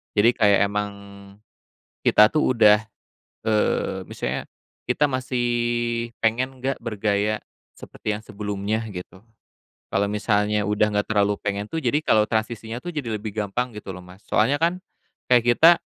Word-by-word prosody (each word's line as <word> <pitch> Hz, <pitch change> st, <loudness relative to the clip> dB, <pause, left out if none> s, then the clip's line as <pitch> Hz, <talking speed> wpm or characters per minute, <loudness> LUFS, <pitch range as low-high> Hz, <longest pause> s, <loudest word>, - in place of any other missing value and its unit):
Jadi, 115 Hz, +4 st, +4 dB
kayak 105 Hz, -4 st, +4 dB
emang 105 Hz, 0 st, -2 dB, 1.1 s
kita 105 Hz, 0 st, +6 dB
tuh 155 Hz, -4 st, +2 dB
udah 105 Hz, -3 st, +5 dB, 0.6 s
eee, 110 Hz, -1 st, 0 dB
misalnya -, -, -4 dB, 0.4 s
kita 150 Hz, 0 st, +2 dB
masih 125 Hz, -1 st, -1 dB, 0.8 s
pengen 125 Hz, +4 st, 0 dB
nggak 135 Hz, +1 st, 0 dB
bergaya 105 Hz, -1 st, -1 dB, 0.3 s
seperti 105 Hz, -, -5 dB
yang 105 Hz, -, -6 dB
sebelumnya 105 Hz, +1 st, -3 dB
gitu. 95 Hz, +1 st, -9 dB, 0.7 s
Kalau 100 Hz, +1 st, +1 dB
misalnya 105 Hz, 0 st, +1 dB
udah 105 Hz, +1 st, +2 dB
nggak 105 Hz, 0 st, 0 dB
terlalu 105 Hz, -1 st, +2 dB
pengen 100 Hz, 0 st, -2 dB
tuh, 160 Hz, -, -3 dB
jadi 130 Hz, +4 st, +2 dB
kalau 110 Hz, -7 st, +4 dB
transisinya 110 Hz, +1 st, -2 dB
tuh -, -, -4 dB
jadi 130 Hz, -7 st, -3 dB
lebih 110 Hz, -1 st, -6 dB
gampang 110 Hz, +4 st, -1 dB
gitu 105 Hz, -2 st, -7 dB
loh, 90 Hz, -, -9 dB
Mas. 90 Hz, +3 st, -16 dB
Soalnya 115 Hz, +7 st, +2 dB
kan 170 Hz, +3 st, +1 dB, 0.5 s
kayak 120 Hz, -2 st, +6 dB
kita, 165 Hz, +6 st, +8 dB
105 Hz, 145 wpm, -23 LUFS, 105-120 Hz, 1.1 s, kita